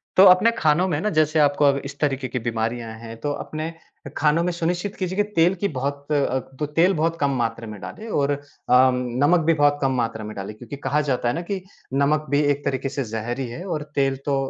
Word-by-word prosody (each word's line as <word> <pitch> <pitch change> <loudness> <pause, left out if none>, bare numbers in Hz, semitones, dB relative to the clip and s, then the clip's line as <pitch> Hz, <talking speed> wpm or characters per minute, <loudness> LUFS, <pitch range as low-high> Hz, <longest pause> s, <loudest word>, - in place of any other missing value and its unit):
तो 190 - +8
अपने 185 +6 +6
खानों 160 +4 +3
में 155 -4 0
न 215 - 0
जैसे 155 0 +2
आपको 145 0 +3
अब 140 -1 +4
इस 140 0 -8
तरीके 135 -3 0
की 125 - -3
बीमारियाँ 115 0 -2
हैं 115 0 -8
तो 145 - -1
अपने 155 +3 -5 0.4
खानों 155 +2 +3
में 180 - 0
सुनिश्चित 175 +3 -2
कीजिए 185 -1 -3
कि 205 - +4
तेल 170 +3 +4
की 200 +2 -1
बहुत 140 +2 -4
अ, 140 -3 +1 0.2
तो 150 - 0
तेल 165 +6 +3
बहुत 165 +1 0
कम 140 -1 +2
मात्रा 115 -1 -2
में 105 -1 -8
डालें 220 - -8
और 145 -9 +1
अ, 145 - -1 0.3
नमक 125 +5 +4
भी 165 - +4
बहुत 145 -1 +3
कम 135 -1 +2
मात्रा 115 -2 -2
में 105 0 -7
डालें 100 +2 -6
क्योंकि 120 +4 -8
कहा 140 +1 0
जाता 130 -4 -1
है 120 - +1
ना 170 - -2
कि 190 +2 -4 0.3
नमक 140 +2 +2
भी 145 +1 +3
एक 145 0 -2
तरीके 135 0 -1
से 140 0 -3
जहर 115 +2 -4
ही 130 - -2
है 165 +9 -7
और 155 -6 -3
तेल 135 -1 +1
तो 140 -1 +1
145 Hz, 235 wpm, -23 LUFS, 125-165 Hz, 0.4 s, तो